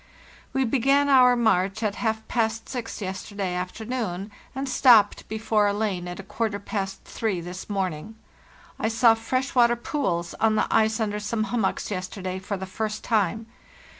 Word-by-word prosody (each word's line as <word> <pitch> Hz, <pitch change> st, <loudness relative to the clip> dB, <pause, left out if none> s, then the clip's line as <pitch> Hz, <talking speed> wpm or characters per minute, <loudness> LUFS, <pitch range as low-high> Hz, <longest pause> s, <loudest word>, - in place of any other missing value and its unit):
"We 265 Hz, -1 st, +1 dB
began 275 Hz, +4 st, +3 dB
our 250 Hz, -2 st, +6 dB
march 215 Hz, -2 st, +1 dB
at 210 Hz, -2 st, +1 dB
half 220 Hz, -1 st, -1 dB
past 225 Hz, -1 st, -1 dB
six 245 Hz, -4 st, -5 dB
yesterday 190 Hz, 0 st, -4 dB
afternoon, 200 Hz, +1 st, -4 dB, 0.2 s
and 270 Hz, +1 st, -3 dB
stopped 235 Hz, -6 st, +5 dB
before 215 Hz, -1 st, +1 dB
a 200 Hz, -, +1 dB
lane 200 Hz, -4 st, -2 dB
at 175 Hz, +1 st, -6 dB
a -, -, -6 dB
quarter 215 Hz, +1 st, -2 dB
past 195 Hz, -1 st, -4 dB
three 215 Hz, -6 st, -2 dB
this 180 Hz, +3 st, -8 dB
morning. 195 Hz, 0 st, -3 dB, 0.6 s
I -, -, 0 dB
saw 225 Hz, +1 st, +5 dB
fresh 255 Hz, +4 st, -2 dB
water 240 Hz, -1 st, +5 dB
pools 230 Hz, -, -2 dB
on 220 Hz, -1 st, +3 dB
the -, -, +2 dB
ice 220 Hz, +1 st, +3 dB
under 210 Hz, -1 st, -1 dB
some 215 Hz, +1 st, -1 dB
hummocks 215 Hz, -3 st, -1 dB
yesterday 185 Hz, 0 st, -4 dB
for 200 Hz, +1 st, -4 dB
the 190 Hz, -, -5 dB
first 215 Hz, +2 st, -4 dB
time. 220 Hz, 0 st, +1 dB
215 Hz, 165 wpm, -25 LUFS, 195-230 Hz, 0.6 s, our